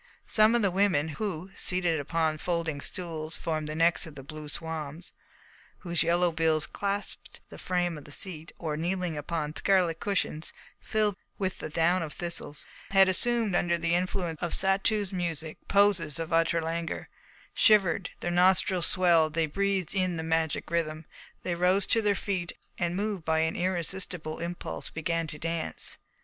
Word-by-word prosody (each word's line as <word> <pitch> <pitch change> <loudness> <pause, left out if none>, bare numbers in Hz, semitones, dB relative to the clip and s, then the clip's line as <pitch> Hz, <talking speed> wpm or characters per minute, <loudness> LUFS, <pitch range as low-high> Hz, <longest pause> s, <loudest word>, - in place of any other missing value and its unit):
Some 215 +2 +4
of 235 - +2
the 195 - +3
women, 180 -5 +2
who, 185 +1 -4
seated 175 -3 +1
upon 155 +1 0
folding 165 -4 -1
stools 165 -2 -3
formed 155 -2 -2
of - - -3
the - - -6
necks 165 +1 +2
of 155 - -11
blue 150 +2 -8
swans, 160 +1 -5 0.7
whose 170 -2 0
yellow 175 +1 +3
bills 160 -1 +2
clasped 200 +3 -4
the - - -11
frame 175 -3 -1
of 145 - -15
the 150 - -12
seat, 165 0 -4
or 155 -3 -3
kneeling 175 +1 -1
upon 150 0 -3
scarlet 185 -4 +2
cushions 185 -6 -2 0.3
filled 210 -2 +1 0.2
with 190 -2 -2
the - - -5
down 170 +3 +2
of 155 -2 -4
thistles, 170 -4 -2 0.2
had 195 -1 +6
assumed 230 +2 +2
under 170 -1 +2
the 170 0 0
influence 175 -2 -1
of 175 - -1
Satou's 195 +1 +1
music 165 -3 -3
poses 195 -7 +3
of 165 0 -4
utter 165 0 +3
languor, 165 +1 -3 0.5
shivered; 195 -4 +4
their 175 - -1
nostrils 180 +1 +4
swelled; 170 -4 +4
they 165 -1 +3
breathed 195 +2 -1
in 185 -3 0
the 160 - -3
magic 160 -1 0
rhythm; 155 -2 -1 0.4
they 180 - -1
rose 180 +3 +3
to 225 - +2
their 205 -1 +2
feet, 185 -4 -2 0.3
and, 175 0 0
moved 200 -3 -2
by 160 0 +1
an 160 0 0
irresistible 180 -2 -2
impulse, 175 +1 -5
began 165 +1 -1
to 155 -1 -6
dance. 165 +1 -3
170 Hz, 165 wpm, -29 LUFS, 160-185 Hz, 0.7 s, had